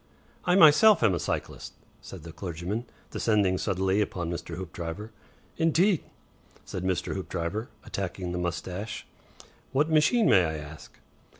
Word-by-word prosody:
"I 180 - +3
myself 170 - +7
am 105 -5 +4
a 85 - -1
cyclist," - - -4 0.3
said - - -10
the 85 - -9
clergyman, 90 +6 -4 0.3
descending 100 -5 +2
suddenly 95 0 +1
upon 90 -4 -2
Mr. 85 0 -5
Hoopdriver. 90 +4 -6 0.5
"Indeed!" 165 +3 +3 0.6
said 90 - -5
Mr. 95 -1 -1
Hoopdriver, 95 +3 -3 0.2
attacking 90 -2 -4
the 90 - -2
moustache. 90 +4 -4 0.7
"What 150 +4 +2
machine, 210 +10 +4
may 95 - +6
I 80 -2 -2
ask?" 75 +1 -11
95 Hz, 130 wpm, -27 LUFS, 85-120 Hz, 0.7 s, myself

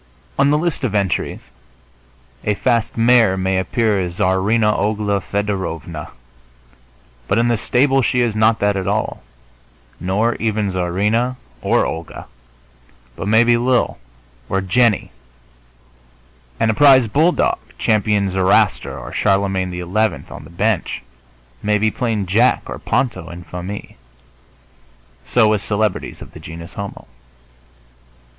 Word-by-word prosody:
On 140 - +4
the 150 - +3
list 160 -2 -2
of 110 -5 -1
entries 100 -3 -1 1.0
a 105 - 0
fast 115 0 0
mare 115 -4 +4
may 95 0 0
appear 105 +2 0
as 90 -1 -4
Czarina 105 +4 +2
Ogla 105 -1 0
Fedorovna, 95 -7 -3 1.2
but 100 - +1
in 120 +1 +2
the 120 - +3
stable 135 +4 +2
she 125 0 +1
is 115 -3 0
not 110 +1 +3
that 100 0 +2
at 95 -1 -3
all, 105 +2 -1 0.8
nor 105 +6 +1
even 110 -3 -1
Czarina 105 +8 0 0.3
or - - +2
Olga, 80 0 -6 0.9
but - - -5
maybe 120 +2 +4
Lil 125 - +1 0.5
or 95 - +1
Jennie. 105 +3 +2 1.5
And 110 - +3
a - - -1
prize 130 0 +6
bulldog, 160 +11 +2 0.2
Champion 105 -2 +1
Zoroaster 95 0 +2
or - - -8
Charlemagne 95 -1 +1
XI. 90 0 -5 0.5
on - - -9
the - - -13
bench, 100 +2 -1 0.6
may 105 0 +1
be 110 +1 +1
plain 110 -5 -1
Jack 110 +7 +2
or - - -7
Ponto 120 -10 -1
en 85 +1 -9
famille. 90 +4 -7 1.3
So 110 - +4
with 105 -2 +1
celebrities 105 +1 -2
of - - -14
the - - -12
genus 85 +3 -10
homo. 100 0 -7
105 Hz, 130 wpm, -19 LUFS, 95-115 Hz, 1.5 s, prize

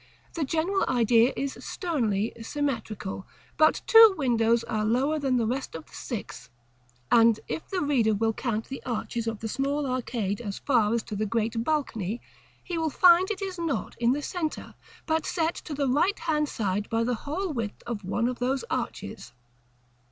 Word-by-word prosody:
the 330 - -1
general 330 +7 0
idea 235 0 +4
is 275 -1 -2
sternly 230 - -1
symmetrical; 225 -8 -3 0.3
but 310 0 +3
two 450 -3 +8
windows 235 -4 +2
are 215 -1 -2
lower 265 +8 +1
than 265 -3 +1
the 235 - +1
rest 255 -1 -3
of 160 -1 -7
the - - -22
six; - - -6 0.6
and 230 -1 +6
if 320 - -4
the 380 -2 -1
reader 245 -7 +2
will 225 +2 +1
count 225 -2 -2
the 270 - -7
arches 235 -1 -3
of 225 -1 -2
the 225 - -3
small 280 +5 -1
arcade 240 -5 -2
as 200 -4 -5
far 230 -6 +2
as 230 -1 0
to 210 - -6
the 215 +1 -1
great 225 +1 -1
balcony, 235 - -1 0.4
he 345 -2 -3
will 320 -1 0
find 355 +4 +5
it 410 -2 -3
is 375 -2 -5
not 330 -4 -2
in 235 0 +3
the 290 +3 -1
centre, 320 -2 -4 0.3
but 320 0 +1
set 330 0 0
to 300 - -7
the 280 -1 0
right 300 +10 +2
hand 305 -3 0
side 205 -1 -2
by 225 0 +1
the 245 +1 0 0.2
whole 360 +2 -2
width 225 -5 -4
of 230 -4 -4
one 215 +5 0
of 250 -1 -3
those 260 +2 0
arches. - - -4
250 Hz, 180 wpm, -27 LUFS, 225-310 Hz, 0.6 s, two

